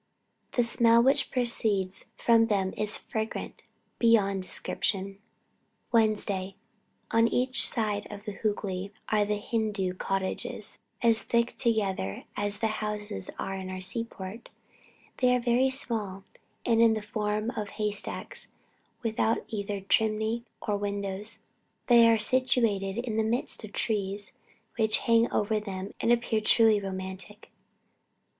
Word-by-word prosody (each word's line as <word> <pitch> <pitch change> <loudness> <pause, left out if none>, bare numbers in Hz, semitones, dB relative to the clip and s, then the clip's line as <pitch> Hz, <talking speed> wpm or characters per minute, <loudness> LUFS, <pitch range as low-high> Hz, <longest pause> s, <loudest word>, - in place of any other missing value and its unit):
The 245 - +3
smell 235 0 +4
which 270 +2 +3
proceeds 215 -6 0
from 230 -1 +4
them 195 -3 0
is 210 0 0
fragrant 220 0 -5 0.3
beyond 205 -5 +3
description. 195 +1 -2 0.7
"Wednesday. 205 -4 +1 0.6
On 230 0 +4
each 255 +2 +4
side 210 -3 -2
of 205 0 -9
the 210 - -3
Hoogly 195 -2 -3 0.2
are 210 -1 +3
the 210 0 -1
Hindoo 210 -4 -1
cottages, 190 +1 -3 0.2
as 230 -1 +4
thick 235 0 0
together 200 - 0
as 205 0 -1
the 220 0 -1
houses 210 - -4
in 190 -1 -5
our 185 0 -5
seaports. 195 +2 -1 0.7
They 250 -1 +4
are - - +1
very 245 +2 +2
small, 215 -7 -2 0.4
and 230 -1 +3
in 225 -1 +5
the 215 - -4
form 215 +1 -2
of 210 -4 -4
hay 210 0 -2
stacks, 205 - -2 0.6
without 225 0 0
either 205 -2 -3
chimneys 220 +3 +1 0.2
or 205 -1 0
windows. 200 +1 -3 0.4
They 235 -2 +7
are 225 - +5
situated 220 -4 +2
in 235 -2 -2
the 220 - +2
midst 230 +2 -1
of 215 - -8
trees 200 -2 -2 0.5
which 220 -1 +2
hang 230 0 +4
over 215 +1 +1
them 195 -2 -6
and 235 - +2
appear 235 -2 +2
truly 220 -1 +4
romantic. 190 +2 -7
215 Hz, 130 wpm, -28 LUFS, 200-230 Hz, 0.7 s, They